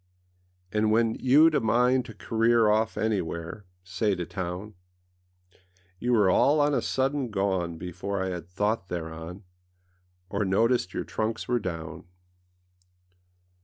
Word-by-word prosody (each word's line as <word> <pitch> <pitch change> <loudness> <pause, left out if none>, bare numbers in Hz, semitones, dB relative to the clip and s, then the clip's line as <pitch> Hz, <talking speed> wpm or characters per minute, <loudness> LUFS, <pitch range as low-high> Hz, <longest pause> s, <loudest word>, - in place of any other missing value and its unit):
And 105 0 +1
when 115 +1 +2
youâd 150 +5 +5
a - - +3
mind 125 +3 +2
to 110 - -10
career 115 0 +2
Off 110 +1 +1
anywhereâsay 95 -3 -2 0.5
to 90 - -3
townâ 95 +4 -5 1.3
You 125 +1 0
were 105 -4 +4
all 140 +11 +4
on 145 0 +3
a - - +1
sudden 135 -1 -1
gone 95 -5 -1
Before 90 +3 -4
I 95 - -2
had 90 -2 -6
thought 105 +2 -1
thereon, 85 +2 -6 0.8
Or 100 +2 -1
noticed 100 +1 +1
your - - -1
trunks 110 +1 -3
were 120 -1 +1
down. 80 -6 -6
105 Hz, 130 wpm, -27 LUFS, 90-115 Hz, 1.3 s, youâd